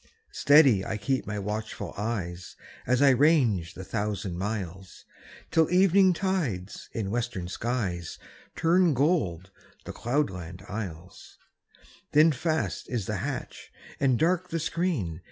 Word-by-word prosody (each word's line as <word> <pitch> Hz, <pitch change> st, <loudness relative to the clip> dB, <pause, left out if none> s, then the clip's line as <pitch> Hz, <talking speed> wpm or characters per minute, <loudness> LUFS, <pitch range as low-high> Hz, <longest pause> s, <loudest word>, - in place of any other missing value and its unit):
Steady 140 Hz, -9 st, +5 dB
I 105 Hz, -, -3 dB
keep 130 Hz, +4 st, -1 dB
my 105 Hz, 0 st, -3 dB
watchful 105 Hz, +2 st, -4 dB
eyes, 95 Hz, -5 st, -4 dB, 0.3 s
As 125 Hz, +3 st, +3 dB
I 140 Hz, -, +7 dB
range 125 Hz, -, +3 dB
the 95 Hz, -, -7 dB
thousand 100 Hz, -2 st, -3 dB
miles. 95 Hz, -1 st, -5 dB, 0.5 s
Till 160 Hz, -1 st, +3 dB
evening 190 Hz, +1 st, +5 dB
tides 160 Hz, -, -3 dB
in 100 Hz, -4 st, -3 dB
western 115 Hz, -6 st, -2 dB
skies 95 Hz, -5 st, -3 dB, 0.4 s
Turn 170 Hz, -1 st, +3 dB
gold 100 Hz, -, 0 dB, 0.3 s
the -, -, -6 dB
cloudland 95 Hz, -, -3 dB
isles; 90 Hz, -5 st, -8 dB, 0.8 s
Then 155 Hz, +2 st, +6 dB
fast 155 Hz, +3 st, -2 dB
is 120 Hz, -6 st, -2 dB
the -, -, -2 dB
hatch -, -, -5 dB, 0.3 s
and 130 Hz, -3 st, +3 dB
dark 180 Hz, +4 st, +1 dB
the 165 Hz, -, -2 dB
screen. 160 Hz, -, -2 dB
115 Hz, 125 wpm, -27 LUFS, 95-155 Hz, 0.8 s, I